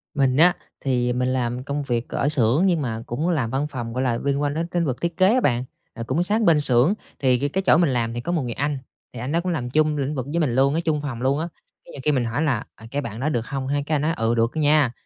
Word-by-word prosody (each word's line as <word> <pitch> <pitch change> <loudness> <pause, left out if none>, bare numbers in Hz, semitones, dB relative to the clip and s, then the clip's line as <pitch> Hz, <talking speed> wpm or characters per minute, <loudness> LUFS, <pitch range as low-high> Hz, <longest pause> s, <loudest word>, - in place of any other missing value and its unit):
Mình 135 -1 +2
á 175 +3 +6 0.3
thì, 125 -2 0
à, - - 0
mình 125 +1 0
làm 125 -1 -1
công 145 +1 -3
việc 120 -3 -2
ở 145 - 0
xưởng 140 - +3
nhưng 170 -5 +2
mà 115 -3 -3
cũng 150 +9 -2
làm 135 -10 0
văn 135 +4 -1
phòng, 120 -5 -6
gọi 130 +1 -1
là, 120 -2 +1
liên 140 0 0
quan 145 -1 0
đến 165 +2 -2
tính 170 -1 -1
vực 130 -3 -3
thiết 170 0 -2
kế 190 +4 +5
á 255 - +3
bạn. 120 -2 +1 0.3
À, 115 - -6
cũng 160 +7 +1
sát 215 +4 +1
bên 165 -7 +4
xưởng 135 +5 +4 0.3
thì 130 -2 +3
c - - -10
cái 190 - +1
chỗ - - +6
mình 170 -4 +3
làm 115 -1 -1
thì 120 - -4
có 170 - -3
một 165 -4 0
người 120 -2 -3
anh, 140 +3 -1 0.4
thì 120 - -7
anh 130 +5 -4
đó 170 - +2
cũng 180 0 -2
làm 125 -7 -2
chung 155 +2 +2
lĩnh 140 +2 -2
vực 130 -2 -3
với 170 - 0
mình 130 -7 +1
luôn 135 +2 +3
á, 165 - +1
chung 150 -2 +1
phòng 130 -5 -5
luôn 135 +3 +1
á, 165 - -2 0.4
cái - - -13
nhiều - - -9
khi 150 - +3
mình 125 -4 +1
hỏi 120 +6 -2
là 135 -8 0
"À, 110 - -14
cái 145 +1 -1
bạn 115 -3 -6
đó 150 +4 0
được 120 -6 0
không 135 -2 -4
ha?" 145 +1 0
cái 155 - 0
anh 145 - 0
nói: 160 +2 +1
"Ừ, 115 +1 +1
được 115 +1 +2
nha, 150 -4 +3
140 Hz, 310 wpm, -23 LUFS, 125-155 Hz, 0.4 s, á